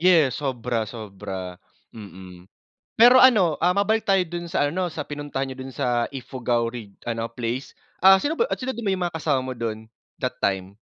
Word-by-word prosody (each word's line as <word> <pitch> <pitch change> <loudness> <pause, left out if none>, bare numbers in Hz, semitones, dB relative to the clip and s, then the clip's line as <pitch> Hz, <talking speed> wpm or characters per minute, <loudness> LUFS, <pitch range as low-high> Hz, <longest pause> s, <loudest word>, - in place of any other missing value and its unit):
Yes, 165 -7 +4
sobra, 120 -5 -2
sobra, 95 -5 -7 0.3
mm. 95 -4 -12 0.5
Pero 240 +2 +8
ano, 200 -11 +5
ah, 180 - +5
mabalik 210 +3 +1
tayo 195 -3 +3
dun 170 0 -6
sa 145 -5 +2
ano, 175 +3 -2
sa 155 -2 -6
pinuntahan 145 -2 -4
niyo 130 0 -7
dun 135 - -8
sa 125 -3 0
Ifugao 125 -3 -2
Reg 115 -4 -7 0.2
ano 115 0 -3
place. 120 +3 -4 0.3
Ah, 190 0 +8
sino 295 +9 -1
ba 460 - +2
yu 470 - -4
ah, - - 0
sino 260 0 -3
ba 220 -4 -1
yung 185 -1 -1
mga 170 - -8
kasama 150 -4 +1
mo 130 0 -4
dun, 110 -2 -5 0.3
that 125 -1 -2
time? 95 0 -1
130 Hz, 195 wpm, -24 LUFS, 115-175 Hz, 0.5 s, Pero